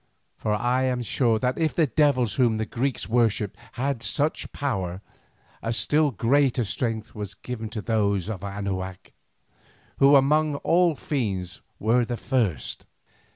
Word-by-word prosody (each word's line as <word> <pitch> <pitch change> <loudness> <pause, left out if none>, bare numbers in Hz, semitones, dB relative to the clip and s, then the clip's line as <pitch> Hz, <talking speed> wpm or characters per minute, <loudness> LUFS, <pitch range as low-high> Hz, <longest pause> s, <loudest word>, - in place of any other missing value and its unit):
For 105 - -1
I 125 +4 +1
am 125 -1 0
sure 115 -1 +2
that 125 +5 -1
if 160 -1 +1
the 165 - +4
devils 130 -5 +2
whom 120 -2 +3
the 110 0 -1
Greeks 125 +3 -2
worshipped 110 -4 +1 0.2
had 130 -1 -2
such 150 +5 -1
power, 95 -10 -2 0.6
a 115 - -2
still 145 +7 +2
greater 130 +3 +2
strength 110 +3 -3
was 105 -3 -6
given 115 -3 -6
to 110 -1 -5
those 100 -5 +1
of 100 -4 -5
Anahuac, 95 -2 -4 0.9
who 140 +1 +7
among 150 +2 +3
all 170 -1 +3
fiends 100 - -3 0.2
were 115 +3 +3
the 120 0 -3
first. 110 - -1
115 Hz, 145 wpm, -25 LUFS, 105-135 Hz, 0.9 s, who